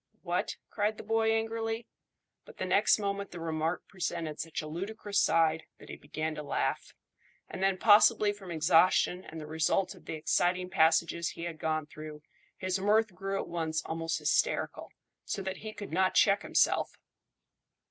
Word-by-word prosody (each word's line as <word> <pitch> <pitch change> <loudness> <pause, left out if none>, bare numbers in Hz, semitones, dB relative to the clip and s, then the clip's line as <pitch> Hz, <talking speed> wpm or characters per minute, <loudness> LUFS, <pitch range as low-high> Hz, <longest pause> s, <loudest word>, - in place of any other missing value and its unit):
"What!" - - -1 0.2
cried 210 +1 0
the - - -8
boy 225 +1 +2
angrily; 225 0 -1 0.6
but - - -15
the - - -2
next - - +4
moment 200 -1 -3
the 175 - -8
remark 160 +1 -2
presented 170 -4 -4
such 160 0 -4
a - - -6
ludicrous 200 +5 -2
side 160 -1 +2
that - - -15
he - - -6
began 155 +2 -4
to 150 - -6
laugh, 145 - -2 0.5
and 190 - -7
then, 195 -1 +2
possibly 210 0 +5
from 200 -3 -12
exhaustion 175 +2 +3
and 160 - -9
the 155 - -7
result 160 +5 0
of 185 - -18
the - - -4
exciting 180 +3 0
passages 165 +1 +2
he 165 - -8
had 170 -2 -5
gone 155 -1 -1
through, 155 0 -10 0.3
his 185 0 -1
mirth 210 +1 +2
grew 195 +2 -3
at - - -4
once 160 -2 -2
almost 165 0 -2
hysterical, - - 0 0.3
so 195 - -4
that 190 0 -4
he 215 0 -7
could 205 -4 -8
not 185 +3 +2
check 200 -1 +5
himself. - - +1
180 Hz, 170 wpm, -30 LUFS, 160-205 Hz, 0.6 s, possibly